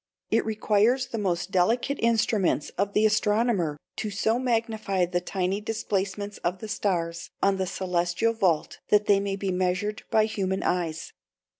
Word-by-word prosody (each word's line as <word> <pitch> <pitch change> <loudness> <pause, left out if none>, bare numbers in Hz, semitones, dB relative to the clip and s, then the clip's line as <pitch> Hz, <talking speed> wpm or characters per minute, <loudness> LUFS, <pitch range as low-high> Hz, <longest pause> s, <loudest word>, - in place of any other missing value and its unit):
It 225 0 +2
requires 220 +4 +2
the 230 - -3
most 180 -2 -1
delicate 230 +9 +1
instruments 215 -8 +1
of 200 +1 -1
the 215 - +3
astronomer 210 -6 +2 0.2
to 215 - -2
so 220 +3 0
magnify 225 -6 0
the 175 0 -1
tiny 190 +2 -2
displacements 205 -2 -3
of 180 +2 -1
the 220 - -7
stars 170 -5 -2
on 195 0 +3
the 190 -1 -1
celestial 180 +3 0
vault 185 -8 0
that 210 0 +4
they 200 -1 +4
may 200 0 -2
be 195 -1 -2
measured 185 +4 -1
by 215 -1 +4
human 190 -3 -2
eyes. 170 -3 -2
200 Hz, 155 wpm, -26 LUFS, 180-220 Hz, 0.2 s, that